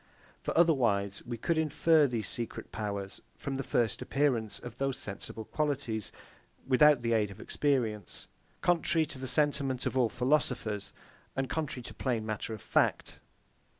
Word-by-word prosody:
For - - -2
otherwise 115 - +3
we 120 -1 -3
could 160 +7 0
infer 155 0 +4
these 115 -6 -2
secret 115 +2 -4
powers 100 -2 -4 0.2
from 135 -1 -4
the 135 - -2
first 120 -2 0
appearance 130 -7 0
of 120 -2 -9
these 135 -1 0
sensible 105 +2 -6
qualities, 130 - -2 0.6
without 135 0 +6
the 115 0 +2
aid 105 -2 +2
of 100 +1 -11
experience; 115 -10 -1 0.3
contrary 170 -2 +3
to 135 - -8
the 130 - -4
sentiment 140 -2 +1
of - - -1
all 125 -3 +3
philosophers, 125 -5 0 0.4
and 135 0 0
contrary 145 -6 -2
to - - -8
plain 120 -5 -1
matter 110 +1 -3
of 110 -3 -6
fact. - - +1
125 Hz, 150 wpm, -31 LUFS, 110-145 Hz, 0.6 s, without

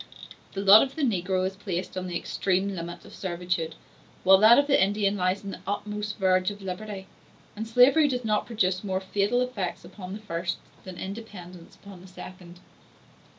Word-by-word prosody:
The 195 - -3
lot 200 +2 +9
of 270 - -2
the 315 - -2
negro 185 -5 0
is 190 +1 -3
placed 185 -2 -4
on 185 0 -3
the 175 -1 -2
extreme 195 +1 -1
limit 175 0 -7
of - - -13
servitude, 175 -3 -3 0.5
while 190 +1 +7
that 220 +3 +8
of 285 - +4
the 280 -9 +4
Indian 200 0 +1
lies 185 +1 0
on 200 - -5
the - - -8
uttermost 210 +1 -3
verge 185 -1 +2
of 205 -1 -9
liberty; 190 +1 -6 0.5
and 220 +2 -5
slavery 260 +7 +5
does 250 -3 -2
not 215 -1 0
produce 190 -5 0
more 190 -2 -1
fatal 200 +5 0
effects 200 -10 -3
upon 185 +1 -9
the 210 - -6
first, 175 -3 -3 0.3
than 185 -2 -8
independence 190 -4 -9
upon 200 -3 -13
the 185 - -13
second. 180 -1 -11
195 Hz, 185 wpm, -26 LUFS, 185-210 Hz, 0.5 s, lot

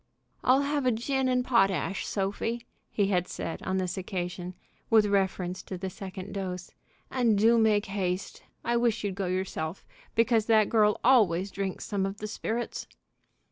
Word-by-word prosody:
"I'll 265 +3 +4
have 285 -2 0
a - - +5
gin 265 +4 0
and 250 -1 +1
potash, 195 - +2
Sophie," 215 +4 -2 0.2
he 200 -2 +1
had 180 -2 +1
said 165 - -5
on 190 0 -1
this 185 0 -2
occasion, 180 -1 -4 0.3
with 220 -2 +6
reference 190 -2 0
to 185 - -7
the 190 +1 -4
second 190 +1 -7
dose, 185 -3 -5 0.4
"and 235 -5 +3
do 230 +3 +5
make 215 -1 +3
haste. 190 -2 -3 0.2
I 235 0 +2
wish 235 -2 +1
you'd 200 -2 -1
go 190 -1 -2
yourself, 180 -2 -3 0.3
because 230 -1 +3
that 220 -2 +4
girl 210 -2 +3
always 200 -7 +4
drinks 195 -2 -3
some 195 -2 -1
of 195 +1 -6
the 215 - -6
sperrits." 225 +2 -3
200 Hz, 165 wpm, -28 LUFS, 185-230 Hz, 0.4 s, with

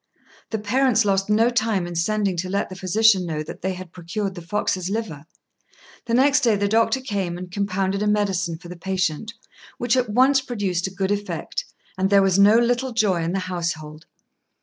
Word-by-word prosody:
The 220 - -2
parents 230 +2 +2
lost 195 0 +1
no 225 +3 +3
time 220 -6 0
in 175 - -6
sending 195 +3 0
to 185 +2 -3
let 200 +2 -1
the 185 - -8
physician 195 +1 +3
know 155 -3 -3
that - - -10
they 190 +1 -1
had 185 -2 -9
procured 185 +3 -4
the 175 - -8
fox's 185 0 -2
liver. 195 -9 -4 0.8
The 230 - +1
next 280 +3 +4
day 235 -6 +3
the 200 0 0
doctor 225 +5 +2
came 195 -8 -3
and 180 0 -8
compounded 195 0 -1
a 210 - 0
medicine 200 -5 0
for 175 - -13
the 180 - -8
patient, 185 +2 -2 0.5
which 240 0 +1
at 250 -3 +1
once 260 +5 +4
produced 200 -9 -2
a - - -7
good 195 +1 -2
effect, 205 - -3 0.3
and 190 +1 +2
there 200 -1 +5
was 190 0 +2
no 205 +3 +7
little 245 +2 +1
joy 205 -6 +1
in 165 +2 -2
the 195 - 0
household. 160 -4 -4
200 Hz, 195 wpm, -23 LUFS, 180-220 Hz, 0.8 s, no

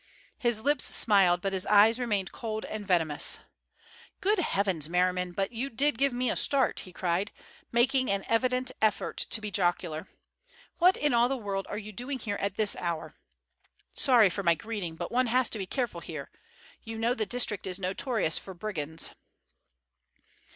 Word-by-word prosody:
His 240 -5 +1
lips 290 +4 +2
smiled, 190 -5 +4
but 195 +1 -1
his 190 0 -2
eyes 215 +3 +6
remained 205 -6 -1
cold 220 -2 -4
and 210 -2 -6
venomous. 160 -5 +2 0.8
"Good 410 +1 +2
heavens, 190 - 0
Merriman, 180 +1 +1
but 195 +2 -2
you 245 +4 -3
did 275 0 +1
give 275 0 +3
me 245 -1 0
a - - -1
start," 275 -2 +2
he 185 - -10
cried, 180 +3 -1 0.4
making 260 +2 +3
an 200 0 0
evident 255 +2 +1
effort 215 -1 +1
to - - +1
be 210 -1 -5
jocular. 175 -3 -1 0.7
"What 365 +2 +5
in 295 -3 +1
all 240 +1 +4
the 270 - -1
world 200 -4 -3
are 205 - -4
you 215 0 -7
doing 250 +6 -5
here 210 -4 -4
at 200 -1 -2
this 210 -1 +1
hour? 170 -2 -3 0.8
Sorry 235 -8 +5
for 200 - -3
my 170 -3 +3
greeting, 195 -2 -5
but 170 +1 -5
one 250 +1 +2
has 250 +2 +2
to 220 - -2
be 190 - -4
careful 235 -10 -2
here. 155 -5 -7 0.5
You 225 0 -7
know 230 +2 +1
the 220 -4 -2
district 220 -4 0
is 185 -1 -2
notorious 195 - 0
for 190 - -10
brigands." 165 -5 -3
210 Hz, 175 wpm, -29 LUFS, 185-245 Hz, 0.8 s, eyes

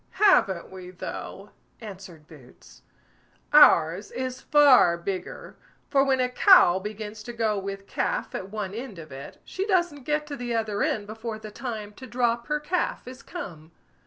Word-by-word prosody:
"Haven't 195 - +3
we 185 -1 -9
though!" 190 +2 -8 0.3
answered 190 -7 -11
Boots; 135 -6 -17 0.7
"ours 180 - +6
is 255 0 -5
far 275 - +5
bigger; 185 +2 -6 0.3
for 275 -2 +4
when 270 -1 +1
a 250 - +2
cow 250 - +6
begins 210 +1 -7
to 240 +3 -8
go 220 -3 0
with 195 0 -6
calf - - -2
at 190 - -5
one 205 -2 -5
end 230 -3 -7
of 160 -3 -11
it, 135 +1 -9
she 385 +2 -4
doesn't 345 - 0
get 300 0 0
to 295 -1 -6
the 245 -3 -4
other 215 -2 -1
end 210 -2 0
before 220 +1 -6
the 215 -1 -10
time 215 -3 -6
to 260 - -11
drop 240 -1 -1
her 300 0 0
calf 340 0 -2
is 255 0 -10
come." 170 - -9
220 Hz, 165 wpm, -26 LUFS, 190-260 Hz, 0.7 s, ours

